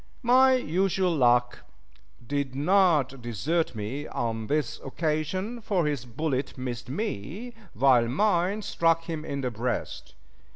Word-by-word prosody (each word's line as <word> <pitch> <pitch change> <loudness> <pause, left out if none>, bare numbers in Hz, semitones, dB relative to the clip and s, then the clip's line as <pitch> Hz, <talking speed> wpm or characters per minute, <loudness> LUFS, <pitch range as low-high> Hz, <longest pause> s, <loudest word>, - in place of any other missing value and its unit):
My 260 +2 +6
usual 185 -5 +1
luck 125 -2 +3 0.7
did 140 0 -2
not 150 -5 +3
desert 125 - -1
me 120 +8 -4
on 115 -2 -3
this 150 -3 -1
occasion, 160 - -2
for 195 -6 0
his 145 -5 -2
bullet 135 +2 -3
missed 125 -1 -5
me, 205 - -4 0.2
while 125 0 +4
mine 195 - +1
struck 165 -2 +1
him 160 -2 -5
in 140 -3 -4
the 125 -2 -2
breast. 120 - -4
150 Hz, 125 wpm, -27 LUFS, 125-180 Hz, 0.7 s, My